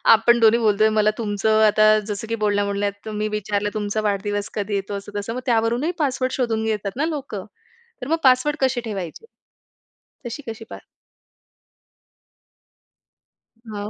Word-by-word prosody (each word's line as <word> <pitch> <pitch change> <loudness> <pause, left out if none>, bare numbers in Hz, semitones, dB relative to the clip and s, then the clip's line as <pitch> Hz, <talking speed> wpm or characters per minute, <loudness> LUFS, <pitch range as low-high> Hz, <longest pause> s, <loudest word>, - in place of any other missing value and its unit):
आपण 235 +2 +3
दोन्ही 225 0 +5
बोलतोय. 215 -1 +3
मला 215 -1 +3
तुमचं 215 0 +1
आता 215 0 +5
जसं 210 +1 -5
की 230 - -1
बोलण्या-बोलण्यात 200 0 0
तुम्ही 215 -1 -2
विचारलं 205 -1 -1
तुमचा 215 0 -2
वाढदिवस 205 0 -1
कधी 205 0 -2
येतो, 200 +1 -3
असं 200 +1 -9
तसं, 205 +3 -4
मग 255 - -2
त्यावरूनही 235 +6 +1
पासवर्ड 260 -3 0
शोधून 225 -4 -1
घेतात 210 -2 -1
ना 295 - +1
लोकं? 275 - -4 0.6
तर 250 - -5
मग 325 +3 +1
पासवर्ड 265 +3 +4
कसे 260 -2 +1
ठेवायचे? 200 - -6 1.0
तशी 240 +5 -6
कशी 225 0 -6
पार - - -8 2.9
हां. 205 0 -4
215 Hz, 145 wpm, -22 LUFS, 205-235 Hz, 2.9 s, दोन्ही